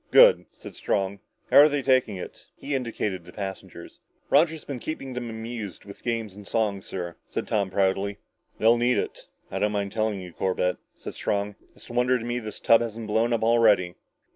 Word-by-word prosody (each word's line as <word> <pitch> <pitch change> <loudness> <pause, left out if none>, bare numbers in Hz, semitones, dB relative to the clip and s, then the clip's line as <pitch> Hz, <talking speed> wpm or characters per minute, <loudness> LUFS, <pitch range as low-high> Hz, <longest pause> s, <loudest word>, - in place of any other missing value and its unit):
"Good," - - +7
said - - -12
Strong. 100 0 -1 0.3
"How're 150 +2 +9
they 145 -2 -1
taking 130 -5 +3
it?" 90 - -9
He 145 - -5
indicated 110 -8 -2
the 90 - -13
passengers. 95 -1 -7 0.3
"Roger's 160 +2 +3
been 135 -3 -5
keeping 135 -2 -5
them 120 -1 -4
amused 110 -5 -6
with 100 - -11
games 115 -4 -2
and 100 0 -11
songs, 105 -4 -1
sir," 85 -2 -5
said - - -3
Tom 100 -3 0
proudly. 95 +1 0 0.4
"They'll 115 +2 +4
need 125 +1 +3
it. - - -4 0.2
I - - -2
don't 105 0 +1
mind 100 -1 -1
telling 110 -2 -1
you, 90 -2 -9
Corbett," 90 0 0 0.2
said - - -8
Strong, 100 0 -1 0.2
"it's - - -13
a - - -8
wonder 125 +1 +3
to 115 - -6
me 120 +1 -1
this 110 -2 -7
tub 115 0 +5
hasn't 115 -1 -4
blown 110 +3 +1
up 115 -1 +1
already." 110 -6 +4
110 Hz, 190 wpm, -26 LUFS, 100-120 Hz, 0.4 s, How're